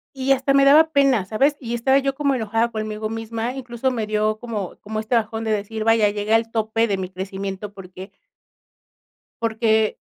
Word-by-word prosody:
Y 270 0 +1
hasta 270 +1 +1
me 275 0 +5
daba 310 +3 +6
pena, 275 -9 +3
¿sabes? 275 +8 +1
Y 240 -2 -4
estaba 265 +3 +3
yo 275 0 -1
como 280 -1 0
enojada 225 0 0
conmigo 215 -1 -4
misma, 225 +1 -4
incluso 250 -1 -3
me 230 -4 -2
dio 215 0 0
como 215 -6 -5
como 215 +1 -4
este 220 +3 -2
bajón 225 0 -1
de 220 - -2
decir: 215 +1 -3
"Vaya, 225 -2 +4
llegué 205 +2 -1
al 225 0 +2
tope 225 0 0
de 200 - 0
mi 185 -1 -5
crecimiento 195 +2 -6
porque" 190 0 -11 1.3
"porque, 220 -1 +1
225 Hz, 185 wpm, -22 LUFS, 210-250 Hz, 1.3 s, daba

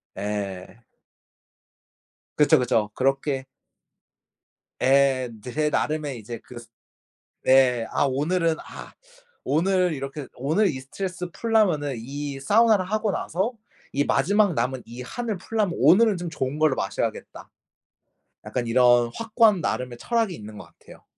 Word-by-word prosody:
예. 100 0 -5 1.6
그쵸, 150 - +5
그쵸. 115 -4 +1
그렇게 135 +1 -1 1.3
예. 135 -1 +3
제 150 +4 -1
나름의 150 -4 -2
이제 115 +2 -8
그 125 - -13 0.9
네. 125 -3 +4
아 - - +1
오늘은 160 +5 +1
아 - - -11 0.5
오늘 180 +4 +2
이렇게 135 +1 -6
오늘 160 - +1
이 135 -6 -4
스트레스 180 +6 -5
풀려면은 180 - +1
이 140 +3 -6
사우나를 210 +5 +4
하고 215 0 0
나서 190 +8 -2 0.4
이 140 - +1
마지막 200 +8 +2
남은 125 0 -1
이 120 +2 -8
한을 220 - -4
풀려면 205 -1 -2
'오늘은 195 - +5
좀 175 -1 -5
좋은 135 -1 -3
걸로 155 -3 +3
마셔야겠다.' - - -4 1.0
약간 120 -2 -3
이런 120 0 +4
확고한 225 -4 +3
나름의 125 -1 -3
철학이 230 - 0
있는 105 -7 -10
것 - - -10
같아요. - - -16
145 Hz, 260 characters per minute, -24 LUFS, 125-185 Hz, 1.6 s, 그쵸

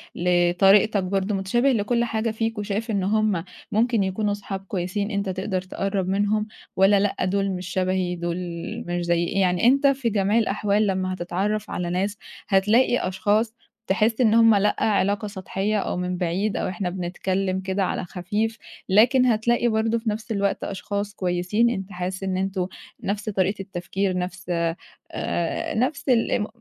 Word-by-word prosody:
لطريقتك 180 +4 +4
برضه، 195 +2 -1
متشابه 240 +8 +2
لكل 235 +1 +1
حاجة 225 -1 -1
فيك 225 0 -2
وشايف 210 +2 -2
إن 200 -3 0
هم 210 -3 +1 0.3
ممكن 225 0 +2
يكونوا 205 +2 -1
أصحاب 200 -1 -4
كويسين 195 +3 -2
أنت 200 -1 -1
تقدر 190 0 -2
تقرّب 195 +1 -2
منهم 205 +2 +1 0.3
والّا 195 +1 +5
لأ، 205 0 0
دُول 195 +1 0
مش 180 -1 -5
شبهي 185 -1 0
دُول 170 0 -3 0.5
مش 175 0 -2
زَيي، 170 0 +2
يعني 180 +1 +2
أنت 275 +3 +5
في 270 -3 +1
جميع 205 0 +1
الأحوال 210 -1 +1
لمّا 185 -1 -1
هتتعرّف 195 +4 -2
على 175 -1 -3
ناس 195 +3 -1 0.3
هتلاقي 210 +6 +3
أشخاص 205 +4 +1 0.3
تحس 220 +5 +2
إن 220 -3 +4
هم 225 -1 +6
لأ، 200 +1 +2
علاقة 205 0 +1
سطحية 200 +1 -2
أو 190 - -2
من 180 0 -2
بعيد 185 +4 -1
أو - - -1
إحنا 185 0 -3
بنتكلِّم 185 +1 -2
كده 190 +1 -1
على 185 - -2
خفيف، 210 +6 -2 0.3
لكن 240 +6 +5
هتلاقي 240 0 +2
برضه 225 0 +1
في 225 0 -2
نَفْس 215 +2 -4
الوقت 200 -2 0
أشخاص 200 +1 -4
كويسين 185 +5 +1
أنت 195 -4 -4
حاسس 185 +1 -4
إن 190 -1 -1
أنتم 190 -1 -1 0.4
نَفْس 210 +2 -2
طريقة 195 0 0
التفكير، 190 0 -2
نَفْس 185 +1 -4 0.7
آآ 170 -1 -2
نَفْس 260 +5 -1
ال 235 -3 +3
ام 210 - +1
200 Hz, 160 wpm, -24 LUFS, 185-215 Hz, 0.7 s, هم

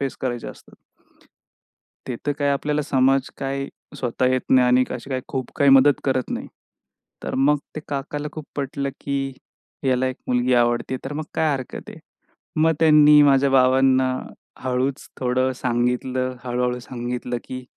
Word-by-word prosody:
Face 135 -2 -3
करायचे 120 -3 -3
असतात. - - -14 1.3
ते 120 - -3
तर 145 - +2
काय, 145 -1 +1
आपल्याला 150 +2 0
समाज 135 -2 +2
काय, 135 0 -3 0.3
स्वतः 125 0 0
येत 130 - +1
नाही 130 -1 +5
आणि 125 +1 +4
अशी 130 +3 -8
काही 130 -1 -2
खूप 130 -2 -4
काही 140 -2 +4
मदत 135 +1 +6
करत 130 -2 0
नाही. - - -4 0.8
तर - - -4
मग 145 +2 +3 0.2
ते - - -3
काकाला 145 +1 -4
खूप 155 - -7
पटलं, 140 0 -2
की 135 -1 -2 0.6
याला 130 0 +2
एक 130 - -3
मुलगी 125 0 +2
आवडते, 120 +2 +1
तर 135 - -5
मग 155 - -3
काय 160 -2 +2
हरकत 130 -2 -6
आहे. - - -11 0.6
मग 160 0 +4
त्यांनी 150 -2 +7
माझ्या 140 -1 +4
बाबांना 130 0 +4 0.5
हळूच 130 +1 -1
थोडं 130 +1 +1
सांगितलं. 125 +1 -1
हळू-हळू 125 0 -1
सांगितलं, 120 0 -4
की 130 0 -7
130 Hz, 155 wpm, -22 LUFS, 125-140 Hz, 1.3 s, त्यांनी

